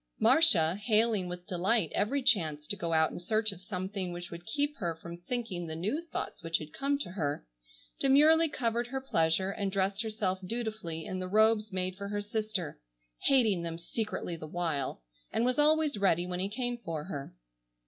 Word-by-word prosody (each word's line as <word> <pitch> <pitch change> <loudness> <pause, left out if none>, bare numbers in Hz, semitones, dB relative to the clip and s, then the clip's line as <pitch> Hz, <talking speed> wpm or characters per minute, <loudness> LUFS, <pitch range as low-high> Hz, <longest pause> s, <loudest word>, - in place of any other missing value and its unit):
Marcia, 225 - +5
hailing 215 -3 +2
with 180 0 -6
delight 185 0 +1
every 265 +7 +1
chance 160 - +2
to 205 - 0
go 170 -4 -3
out 160 -1 +3
in - - -6
search 215 +4 0
of 185 - -11
something 185 0 -3
which 175 0 -6
would 170 0 -9
keep 290 +5 0
her 170 -6 -2
from 170 +1 -8
thinking 180 -2 -4
the 160 - -4
new 210 - -1
thoughts 335 - -5
which 165 0 0
had 155 -1 -9
come 280 +1 0
to 280 - -4
her, 145 - -2 0.5
demurely 310 +4 +6
covered 235 -3 -1
her 265 +2 -3
pleasure 190 -6 +1
and 200 -1 -2
dressed 195 +1 0
herself 215 -4 -1
dutifully 215 -6 -4
in 185 - -4
the 185 - -3
robes 215 +1 +3
made 185 0 -1
for 200 0 -5
her 205 0 -2
sister, 210 - -3 0.5
hating 225 -9 +4
them 165 -1 -4
secretly 195 0 -3
the 155 -1 -8
while, 155 - -2 0.3
and 230 - +1
was 255 +2 +1
always 305 0 +4
ready 175 -3 +3
when 180 0 -4
he 195 +2 0
came 245 +2 -2
for 165 -9 -4
her. 140 - -6
195 Hz, 190 wpm, -31 LUFS, 170-230 Hz, 0.5 s, demurely